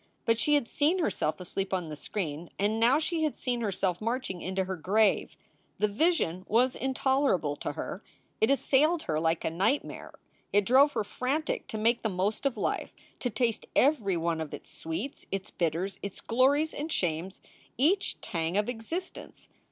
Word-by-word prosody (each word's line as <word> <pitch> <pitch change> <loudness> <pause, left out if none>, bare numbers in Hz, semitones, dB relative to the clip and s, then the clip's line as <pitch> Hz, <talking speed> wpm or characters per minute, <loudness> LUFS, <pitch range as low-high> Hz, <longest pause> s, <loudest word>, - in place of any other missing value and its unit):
But 230 0 +3
she 295 +3 +3
had 285 -5 +1
seen 305 +9 +2
herself 195 - 0
asleep 190 +2 -3
on 175 -4 -3
the 150 - -5
screen, 165 0 -4
and 210 +3 +1
now 235 +5 +5
she 320 +1 -1
had 310 -2 0
seen 245 -2 -2
herself 195 -4 -1
marching 230 -5 -2
into 190 +1 -1
her 190 0 -3
grave. 200 +6 +2 0.4
The 210 - +2
vision 205 - +1
was 250 +4 +3
intolerable 265 - +1
to - - -4
her. 185 - -5 0.4
It 220 - +4
assailed 295 +4 +3
her 155 -1 -1
like 160 0 0
a - - 0
nightmare. 195 - -1 0.4
It 205 0 +3
drove 270 +5 +6
her 220 - 0
frantic 265 +9 -2
to 220 - -5
make 230 +2 +2
the 220 - 0
most 200 +7 0
of 255 -4 -3
life, - - -2 0.2
to 245 - -1
taste 230 0 -1
every 225 - +3
one 165 -1 0
of 155 - -4
its - - -13
sweets, 165 +13 -5
its 195 -1 -4
bitters, 175 +3 -1
its 200 -1 -6
glories 280 +6 +2
and 305 +3 -4
shames, 175 - -1 0.4
each 360 +10 +2
tang 170 -3 -2
of 210 - +2
existence. 245 +10 -6
220 Hz, 175 wpm, -29 LUFS, 185-270 Hz, 0.4 s, drove